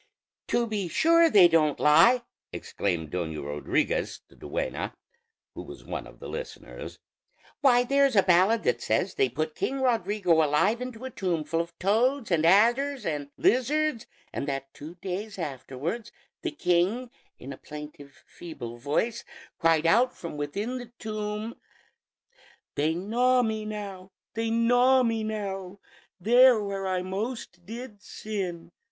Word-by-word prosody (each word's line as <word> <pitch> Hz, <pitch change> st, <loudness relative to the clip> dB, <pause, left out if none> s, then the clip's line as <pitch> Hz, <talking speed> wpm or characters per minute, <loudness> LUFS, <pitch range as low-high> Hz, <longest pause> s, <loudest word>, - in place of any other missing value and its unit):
"To 240 Hz, -, +1 dB
be 210 Hz, -5 st, -2 dB
sure 330 Hz, -, +4 dB
they 195 Hz, -, +8 dB
don't 155 Hz, -3 st, +2 dB
lie!" 165 Hz, +12 st, +5 dB, 0.3 s
exclaimed 85 Hz, -6 st, -3 dB
Doña 80 Hz, -5 st, -3 dB
Rodriguez, 295 Hz, -, -1 dB
the -, -, -20 dB
duenna, -, -, -4 dB, 0.6 s
who -, -, -7 dB
was -, -, -11 dB
one -, -, -5 dB
of -, -, -16 dB
the -, -, -8 dB
listeners. -, -, -8 dB, 0.6 s
"Why, 245 Hz, -4 st, +5 dB
there's 275 Hz, 0 st, +3 dB
a 195 Hz, -, +6 dB
ballad 190 Hz, +5 st, +4 dB
that -, -, +1 dB
says 185 Hz, -, 0 dB
they 130 Hz, -, +2 dB
put 155 Hz, +5 st, -3 dB
King 270 Hz, -, -2 dB
Rodrigo 205 Hz, -9 st, +2 dB
alive 190 Hz, +11 st, +2 dB
into 250 Hz, -1 st, -6 dB
a 260 Hz, -, -5 dB
tomb 175 Hz, -5 st, -1 dB
full 165 Hz, +2 st, -1 dB
of 170 Hz, 0 st, -9 dB
toads 230 Hz, +5 st, +1 dB
and 165 Hz, -1 st, +3 dB
adders 240 Hz, +9 st, +3 dB
and 145 Hz, -3 st, -3 dB
lizards, 275 Hz, +1 st, +1 dB, 0.3 s
and 140 Hz, -, -3 dB
that 135 Hz, -1 st, -4 dB
two 155 Hz, +4 st, -10 dB
days 200 Hz, +3 st, -4 dB
afterwards 150 Hz, -, -5 dB, 0.3 s
the -, -, -2 dB
king, 195 Hz, -, 0 dB, 0.3 s
in 135 Hz, +2 st, -8 dB
a -, -, -11 dB
plaintive, 150 Hz, -2 st, -11 dB
feeble 120 Hz, -9 st, -9 dB
voice, 155 Hz, -, -1 dB, 0.4 s
cried 165 Hz, -1 st, +3 dB
out 240 Hz, +9 st, +3 dB
from 170 Hz, -3 st, -7 dB
within 200 Hz, -, -3 dB
the 240 Hz, -1 st, -10 dB
tomb 215 Hz, +1 st, -4 dB, 1.2 s
'They 155 Hz, +3 st, 0 dB
gnaw 245 Hz, +7 st, +2 dB
me 220 Hz, -1 st, -2 dB
now, 200 Hz, -3 st, -6 dB, 0.2 s
they 225 Hz, 0 st, -1 dB
gnaw 245 Hz, +3 st, +4 dB
me 225 Hz, -2 st, 0 dB
now, 200 Hz, -3 st, -4 dB, 0.4 s
There 245 Hz, +4 st, +6 dB
where 195 Hz, -2 st, -3 dB
I 185 Hz, -1 st, -1 dB
most 190 Hz, -2 st, -5 dB
did 230 Hz, -2 st, -8 dB
sin.' 185 Hz, -6 st, -5 dB
200 Hz, 145 wpm, -27 LUFS, 165-240 Hz, 1.2 s, they